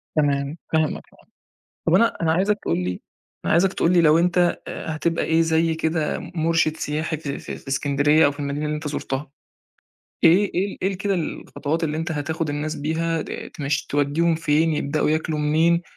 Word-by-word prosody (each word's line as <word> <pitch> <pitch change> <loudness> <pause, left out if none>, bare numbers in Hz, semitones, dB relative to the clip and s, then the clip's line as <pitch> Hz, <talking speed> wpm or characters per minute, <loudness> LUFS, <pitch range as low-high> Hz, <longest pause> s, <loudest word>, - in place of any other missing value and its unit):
تمام، 145 0 +1 0.2
فاهمك 160 -1 +1
طبعًا، - - -23 0.6
طَب 165 - +3
أنا 230 +4 +4
أنا 160 -1 +3
عايزك 200 +4 +1
تقول 85 - 0
لي 90 0 -3 0.4
أنا - - +1
عايزك 180 +3 +3
تقول 175 - +1
لي 175 - +5
لو 155 0 +5
أنت 175 +1 +2 0.3
آآ 160 - -5
هتبقى 165 +1 0
إيه 160 +1 +2
زي 160 0 +2
كده 160 -1 -1
مرشِد 165 -2 0
سياحي 155 +2 -2
في 140 -2 -5
في - - -7
في - - -14
إسكندرية 145 +3 +3
أو - - +2
في 145 - -15
المدينة 145 +1 -2
اللي 150 0 -1
أنت 150 0 -4
زُرتها، 140 -1 -4 0.9
إيه 185 +5 +5
إيه 195 +2 -1
إيه 190 +1 +1
كده 200 -1 0
الخطوات 160 -1 -3
اللي 155 0 -2
أنت 160 0 -2
هتاخد 160 +2 -2
الناس 150 +1 -3
بيها 160 +2 -1
د - - -7
تمش 140 -1 -2
توّديهم 145 +4 +1
فين؟ 160 0 +2
يبدأوا 150 +1 0
ياكلوا 155 0 -1
منين؟ 160 +3 +2
160 Hz, 185 wpm, -23 LUFS, 150-165 Hz, 0.9 s, لي